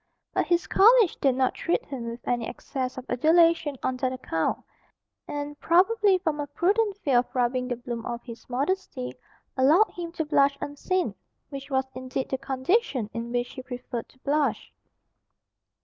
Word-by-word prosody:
But - - +1
his 345 0 +2
college 450 -1 +5
did 270 -3 +3
not 260 -1 +2
treat 340 - -1
him 245 -4 -5
with 235 +1 -9
any 240 -2 0
excess 255 +1 -4
of 260 - -6
adulation 320 +2 +3
on 255 - 0
that 255 0 0
account, 165 -11 -2 0.6
and, 290 0 -5
probably 385 +3 +4
from 315 -4 -2
a 290 - -2
prudent 395 +7 +1
fear 275 -11 +3
of 245 - -4
rubbing 250 0 +1
the 245 - -1
bloom 240 -1 -6
off 235 0 -4
his 235 -1 -11
modesty, 255 - -2 0.4
allowed 305 +11 +5
him 340 -1 -6
to 320 -2 -2
blush 280 -2 +3
unseen 350 +6 -1 0.4
which 275 0 -7
was 265 -1 +1
indeed 255 +1 -4
the 265 - -2
condition 265 - 0
in 230 +1 -4
which 245 0 -1
he 260 - -7
preferred 245 -2 -6
to - - -23
blush. 295 +1 0
270 Hz, 165 wpm, -26 LUFS, 250-335 Hz, 0.6 s, college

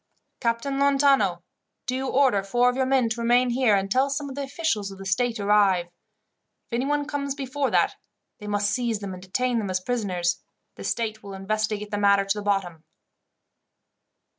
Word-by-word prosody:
"Captain 235 +4 -1
Lontano, 275 -11 +3 0.4
do 255 - -2
you 265 +1 -2
order 260 -7 +3
four 240 +5 +2
of - - -8
your 260 0 0
men 260 -3 +3
to 225 +1 -3
remain 245 +1 +3
here, 240 -4 +3
until 200 +8 +1
some 280 +1 -3
of 265 - -8
the 285 - -3
officials 270 -7 -2
of 195 - -10
the 195 - -9
state 230 +4 0
arrive. 200 -3 +3
If 175 +6 -26
anyone 290 +4 0
comes 280 -2 -3
before 275 0 -2
that, - - +1 0.4
they 210 - -9
must 205 0 0
seize 235 -1 0
them 200 -2 -6
and 185 - -9
detain 240 +6 -1
them 205 -3 -3
as 185 0 0
prisoners. 185 -6 -1 0.3
The - - -10
state 220 -2 -2
will 200 -1 -8
investigate 210 +1 -2
the 205 - -1
matter 200 -1 +4
to 195 +2 -1
the - - -6
bottom." 190 -6 -1
225 Hz, 185 wpm, -25 LUFS, 195-260 Hz, 0.4 s, matter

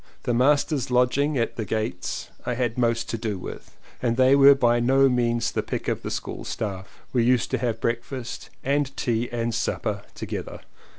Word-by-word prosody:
The 120 - 0
masters' 140 +2 +2
lodging 130 +4 +2
at 115 -1 -1
"The 115 - -1
Gates" 110 -3 -3
I 125 - -2
had 120 -2 -1
most 115 -2 +1
to 115 - -3
do 110 -3 -2
with 90 - -9 0.2
and 120 -1 0
they 130 +1 +6
were 140 0 +8
by 120 -3 +3
no 135 +3 +4
means 120 -2 +1
the - - -1
pick - - -4
of - - -1
the - - -4
school - - -5
staff. 95 -3 -5
We 120 -3 +3
used 125 0 +2
to - - 0
have 115 -3 -1
breakfast 120 +2 -4
and 140 0 0
tea 120 0 0
and 120 -1 -1
supper - - -2
together. - - -6
120 Hz, 185 wpm, -25 LUFS, 115-130 Hz, 0.2 s, were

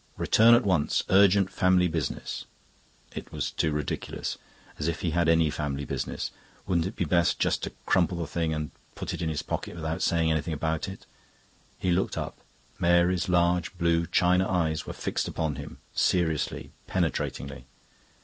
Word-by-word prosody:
"Return 115 +2 +6
at 120 -1 +2
once. 85 -6 +2
Urgent 95 0 +5
family 90 -1 +3
business." 80 -5 -3 0.7
It - - -7
was - - -2
too 80 - 0
ridiculous. 75 -1 -3 0.4
As 75 - -1
if 85 -1 -2
he 85 - 0
had 85 0 +2
any 80 -2 +4
family 70 -2 -3
business! - - -3 0.3
Wouldn't 85 -2 +1
it 100 - -7
be 90 - -1
best 85 +1 +2
just - - +1
to - - -3 0.2
crumple 90 -1 +2
the 85 - -2
thing 80 +1 -1
up 80 - -1
and 75 -2 -4 0.2
put - - -4
it - - -5
in 80 - 0
his 75 -2 -2
pocket - - -4
without 80 +1 -3
saying 80 -1 +2
anything 80 +1 -1
about 80 +4 -1
it? 95 - -10 0.7
He 90 - 0
looked 90 +2 0
up; - - -4 0.4
Mary's 85 +1 +3
large 90 0 +2
blue 85 -1 +2
china 90 0 +3
eyes 80 -4 0
were - - -4
fixed - - -2
upon 80 -4 -2
him, 70 +1 -8 0.2
seriously, 80 -4 0 0.2
penetratingly. 65 -1 -2
85 Hz, 170 wpm, -27 LUFS, 80-90 Hz, 0.7 s, Return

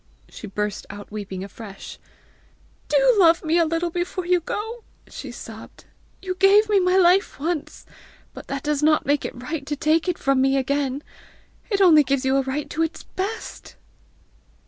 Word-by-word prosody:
She 215 - -9
burst 210 +1 -4
out 205 +1 -10
weeping 195 -3 -6
afresh. 200 0 -10 0.9
"Do - - +4
love 335 -2 +5
me 325 +2 +2
a 335 - +4
little 330 +2 -1
before 355 +1 -3
you 360 0 +3
go," 445 +7 -5 0.2
she - - -8
sobbed. - - -11 0.4
"You 370 -1 -2
gave 390 +3 +5
me 410 -2 +4
my 365 0 +2
life 370 0 +3
once, 315 0 -4 0.5
but - - -11
that 275 0 -4
does 300 -1 0
not 305 0 +3
make 285 +1 +1
it - - -5
right 295 +3 -4
to 295 - -2
take 315 +4 +1
it 355 - -1
from 270 -1 +1
me 270 +1 +3
again! 275 +1 -1 0.7
It 400 -3 +1
only 320 -5 +7
gives 275 0 -1
you 265 0 +2
a - - +3
right 270 +2 -3
to 320 - -2
its 325 0 -2
best!" 400 +4 -6
310 Hz, 175 wpm, -23 LUFS, 270-365 Hz, 0.9 s, only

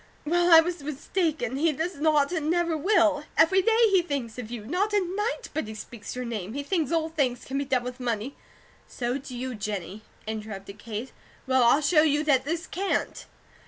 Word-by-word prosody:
Well, 345 +3 +2
I 325 -1 +10
was 340 -1 -4
mistaken. 295 -2 -2
He 320 +3 +3
does 325 +4 -3
not, 300 -1 +3
and 315 -4 -1
never 340 -1 +1
will. 325 -3 +3
Every 380 +4 +5
day 455 +3 +4
he 380 -2 +5
thinks 270 -8 -4
of 225 -3 -6
you; 230 -3 -6
not 375 - 0
a 415 - +4
night 415 +7 -3
but 310 -8 -2
he 220 - -7
speaks 215 0 -8
your 250 0 -4
name. 215 -3 -4
He 285 +2 -3
thinks 320 -2 -1
all 325 -1 +1
things 265 -6 -1
can 270 +1 -2
be 280 - -2
done 260 -2 +1
with 250 +1 -6
money 240 +1 -3 0.3
" - - -30
"So 245 +2 -3
do 260 -2 -8
you, 255 +1 -4
Jennie," 205 -2 -5 0.2
interrupted 210 -2 -6
Kate. 225 +3 -6 0.3
"Well, 260 0 +3
I'll 240 +5 +5
show 305 +1 +4
you 300 -1 +2
that 270 -4 +2
this 335 +3 -2
CAN'T!" 390 +2 -2
285 Hz, 205 wpm, -26 LUFS, 240-335 Hz, 0.3 s, I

